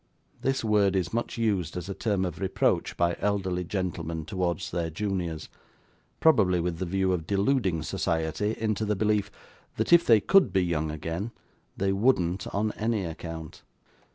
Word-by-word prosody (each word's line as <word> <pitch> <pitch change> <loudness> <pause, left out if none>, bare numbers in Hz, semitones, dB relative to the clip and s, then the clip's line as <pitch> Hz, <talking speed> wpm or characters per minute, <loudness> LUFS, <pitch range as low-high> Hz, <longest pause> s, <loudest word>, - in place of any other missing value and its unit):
This 135 -1 0
word 105 -3 +3
is 90 -3 -1
much 120 +1 -2
used 100 -8 0
as 90 0 -5
a 100 - -3
term 100 -2 0
of 85 -3 -5
reproach 95 -1 0
by 85 0 +2
elderly 95 -3 0
gentlemen 85 -4 -3
towards 90 0 -2
their 85 -1 -1
juniors: 85 -2 -3 0.7
probably 105 - +4
with 85 -1 -2
the 95 - -2
view 95 +1 +1
of 80 -3 -3
deluding 100 - +1
society 80 +7 -1
into 110 -1 -1
the 105 0 0
belief 105 0 +1 0.5
that 110 +10 +1
if 170 0 +8
they 115 -2 +6
could 190 - +4
be 95 -1 +2
young 80 -2 -1
again, 80 +7 -4 0.5
they 95 0 +1
wouldn't 95 -4 +1
on 105 +2 -1
any 110 -2 -1
account. 80 -1 -7
95 Hz, 160 wpm, -27 LUFS, 85-105 Hz, 0.7 s, if